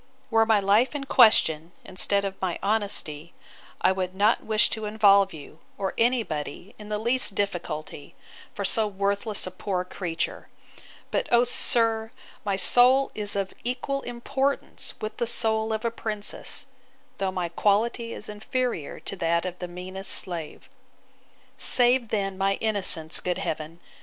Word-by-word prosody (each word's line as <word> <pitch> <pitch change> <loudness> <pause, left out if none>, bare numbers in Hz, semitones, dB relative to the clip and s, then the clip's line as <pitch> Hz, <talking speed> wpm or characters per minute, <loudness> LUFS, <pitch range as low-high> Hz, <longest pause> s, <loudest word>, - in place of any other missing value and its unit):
'Were 225 0 +4
my 220 -2 +4
life 210 +8 +3
in 285 - -3
question, 170 - +4
instead 200 +1 +1
of 195 -1 -6
my 185 -2 -1
honesty, 195 -7 -1 0.5
I - - +4
would 185 -1 -3
not 210 +4 +3
wish 220 0 +3
to 220 -1 -3
involve 200 -2 +4
you, 155 0 -12 0.2
or 195 -1 -2
any 240 +1 +2
body, 150 +3 -6
in 210 0 -10
the 210 - -1
least 235 -1 +1
difficulty, 165 -7 -4 0.4
for 200 - -4
so 215 +2 +1
worthless 200 +1 -1
a 185 - -5
poor 185 0 -3
creature. 175 -3 -4 0.6
But, - - -1
O 240 0 +6
sir! 225 -2 +3 0.3
my 200 -1 0
soul 245 +8 +5
is 205 -1 -1
of 195 -1 -2
equal 255 +3 -2
importance 265 +3 -2
with 215 0 -5
the 235 - -1
soul 220 -1 +1
of 220 +1 -2
a 230 - +1
princess; 215 +3 -3 0.5
though 195 -1 0
my 180 -2 -3
quality 225 +6 +1
is 210 - -8
inferior 215 - -3
to - - -6
that 170 0 0
of 180 -1 -5
the 180 - -4
meanest 185 +2 -4
slave. 170 -5 -5 0.9
'Save 245 -1 +3
then 195 -3 -2
my 195 0 +2
innocence, 190 -7 +1
good 180 -1 -2
Heaven! 160 -3 -4
200 Hz, 150 wpm, -26 LUFS, 185-225 Hz, 0.9 s, O